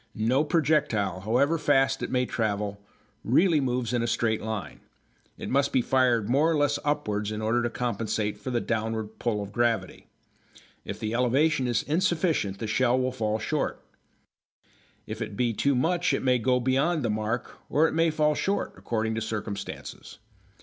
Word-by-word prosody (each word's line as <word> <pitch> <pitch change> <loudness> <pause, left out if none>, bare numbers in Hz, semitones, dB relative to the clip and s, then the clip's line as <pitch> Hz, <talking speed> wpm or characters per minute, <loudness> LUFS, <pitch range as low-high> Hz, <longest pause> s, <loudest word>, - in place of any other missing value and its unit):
No 120 +7 +2
projectile, 145 - +1
however 125 - +1
fast 135 -2 +2
it - - -3
may 125 -1 +1
travel, 105 -3 -2 0.4
really 160 +6 +3
moves 125 -2 -1
in 120 - +1
a 115 - -1
straight 115 -1 0
line. 110 -2 -5 0.6
It - - -6
must 140 +1 +1
be 130 - +2
fired 125 -5 +2
more 140 +7 +3
or 160 - +1
less 145 0 +1
upwards 105 -9 -1
in 105 - -4
order 110 +3 +1
to 120 - 0
compensate 110 -3 -2
for 105 - -6
the 120 -2 0
downward 110 -1 -3
pull 105 -3 -1
of 100 - -9
gravity. 120 0 -1 0.8
If - - -6
the 110 +1 -3
elevation 130 +3 +2
be 120 - -1
insufficient 160 - 0
the 110 - -4
shell 120 +3 +2
will 130 0 0
fall 110 -4 -1
short; 110 - -2 1.3
if - - -6
it 100 - -5
be 120 -2 +1
too 140 +5 +1
much 170 +7 +1
it - - -1
may 125 -1 +3
go 125 +2 +2
beyond 135 +6 +1
the 115 - +1
mark, 110 +3 -3
or 155 +3 +4
it - - -3
may 165 +1 +3
fall 150 -1 +2
short, 195 +7 -1
according 110 -1 -2
to 110 - -2
circumstances. 105 -2 -6
120 Hz, 175 wpm, -27 LUFS, 110-140 Hz, 1.3 s, or